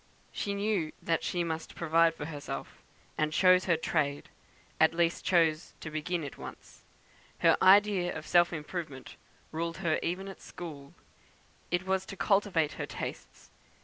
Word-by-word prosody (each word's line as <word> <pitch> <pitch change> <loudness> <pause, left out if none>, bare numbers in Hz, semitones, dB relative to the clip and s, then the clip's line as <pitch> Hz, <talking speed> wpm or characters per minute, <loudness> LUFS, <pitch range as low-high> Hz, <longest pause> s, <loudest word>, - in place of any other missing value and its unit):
She 200 -1 -3
knew 200 -6 0
that 165 -1 0
she 175 -1 -1
must 160 -1 -4
provide 165 0 +3
for 145 - -6
herself, 145 -2 -7 0.4
and 155 0 +1
chose 185 +2 +5
her 170 -3 +3
trade; 145 -3 -1 0.5
at 160 +1 +5
least 170 0 +1
chose 165 -3 +2
to 160 - -7
begin 155 +2 -2
it 140 - -8
once. - - -11 0.6
Her - - +6
idea 195 -2 +5
of 155 - -8
self 175 -1 +4
improvement 155 -3 -6 0.4
ruled 165 +1 -3
her 160 -2 +2
even 185 +3 -2
at 195 - -9
school. 145 -5 -9 0.7
It 175 +1 0
was 190 0 0
to 195 - -8
cultivate 195 -7 +2
her - - -3
tastes. - - -7
170 Hz, 150 wpm, -30 LUFS, 155-185 Hz, 0.7 s, Her